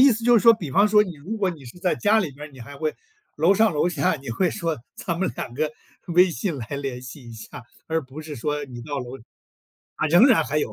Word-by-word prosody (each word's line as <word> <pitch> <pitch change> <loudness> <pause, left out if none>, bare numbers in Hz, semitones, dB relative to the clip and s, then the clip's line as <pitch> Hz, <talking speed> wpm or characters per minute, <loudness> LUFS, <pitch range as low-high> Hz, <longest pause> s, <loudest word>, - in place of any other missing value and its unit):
意 270 -1 +8
思 225 +1 -4
就 240 -1 +6
是 - - -3
说， 230 -1 +8
比 165 -10 -7
方 200 +9 +4
说 210 0 +5
你 180 -5 -6
如 190 +11 -6
果 195 -3 +1
你 150 -6 -11
是 120 +9 -12
在 185 - +1
家 220 +1 +3
里 165 -7 -2
边， 145 +2 -11
你 130 - -13
还 140 +5 -10
会 155 +1 -2 0.4
楼 165 +6 +4
上 220 -2 +3
楼 150 +4 +2
下 160 -6 +1
你 135 -3 -8
会 180 +9 +1
说： 165 -4 -2 0.2
“咱 170 -1 -4
们 190 - +1
两 - - -5
个 155 +3 -2 0.4
微 180 +1 +5
信 170 -3 -3
来 115 -4 -6
联 135 -3 -5
系 125 -1 -10
一 - - -9
下。” 115 +2 -10 0.2
而 160 0 +1
不 135 +4 -10
是 150 -2 -7
说； 150 +5 -2
“你 120 -2 -9
到 145 0 -4
楼” 125 +1 -8 0.8
啊， 155 - 0
仍 175 - +7
然 215 - +4
还 150 +2 -1
有。 - - -2
155 Hz, 280 characters per minute, -24 LUFS, 140-190 Hz, 0.8 s, 意